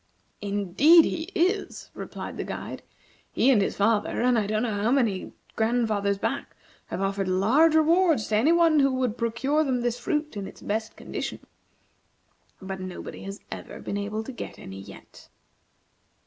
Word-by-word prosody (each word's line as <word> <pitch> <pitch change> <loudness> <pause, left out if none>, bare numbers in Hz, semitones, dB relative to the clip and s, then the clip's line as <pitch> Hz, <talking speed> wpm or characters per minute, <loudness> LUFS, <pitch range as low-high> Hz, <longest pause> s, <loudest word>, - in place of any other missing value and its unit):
"Indeed 205 - +5
he 320 - -2
is!" 380 +3 0
replied - - -7
the - - -2
guide. - - -6 0.5
"He 265 - +3
and 225 -6 +4
his - - -1
father, 210 +1 +1
and 250 0 +4
I 215 -3 +1
don't 215 +1 0
know 210 -4 -1
how 215 - +2
many 235 -8 +1 0.2
grandfathers 220 -3 +1
back, - - -3 0.3
have - - -4
offered 195 0 -1
large 240 - +4
rewards 320 - +4
to 215 - +1
any 265 +9 +4
one 335 -3 +5
who 275 -1 +4
would 255 -4 0
procure 255 +6 0
them 255 -4 0
this 240 0 -1
fruit 300 +2 -2
in 200 -2 -4
its - - -13
best 220 +2 -3
condition. - - -5 1.2
But 190 -1 -6
nobody 185 -1 -7
has 195 +1 -7
ever - - -7
been - - -5
able 210 +2 -3
to 265 - -7
get 245 - -8
any 95 0 -9
yet." - - -14
225 Hz, 165 wpm, -26 LUFS, 200-285 Hz, 1.2 s, Indeed